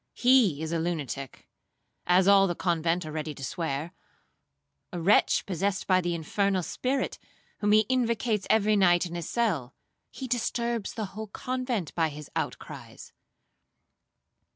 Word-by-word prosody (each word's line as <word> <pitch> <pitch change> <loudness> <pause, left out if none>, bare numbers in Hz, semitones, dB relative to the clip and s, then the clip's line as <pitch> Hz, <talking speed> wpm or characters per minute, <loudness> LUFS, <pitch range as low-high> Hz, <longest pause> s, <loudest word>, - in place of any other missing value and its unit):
He 240 - +4
is 160 - -4
a 165 - 0
lunatic, 145 -6 -4 0.6
as 180 +2 +4
all 200 -1 +6
the 175 - -2
convent 170 0 0
are 155 - -6
ready 155 -1 -4
to 135 - -9
swear,—a 165 +4 -8
wretch 185 +5 +3
possessed 195 +1 -1
by 185 -1 +3
the 175 -1 -1
infernal 190 +3 0
spirit, 260 +9 -2 0.4
whom 205 0 +1
he 215 0 +5
invocates 235 -4 0
every 215 -1 +3
night 175 -3 +4
in 170 - -7
his 170 -2 -5
cell,—he 215 - -4
disturbs 235 -2 -2
the 220 - -2
whole 220 +2 -6
convent 250 - -3
by 165 -2 +1
his 150 0 -10
outcries.' - - -6
185 Hz, 135 wpm, -28 LUFS, 165-220 Hz, 0.6 s, all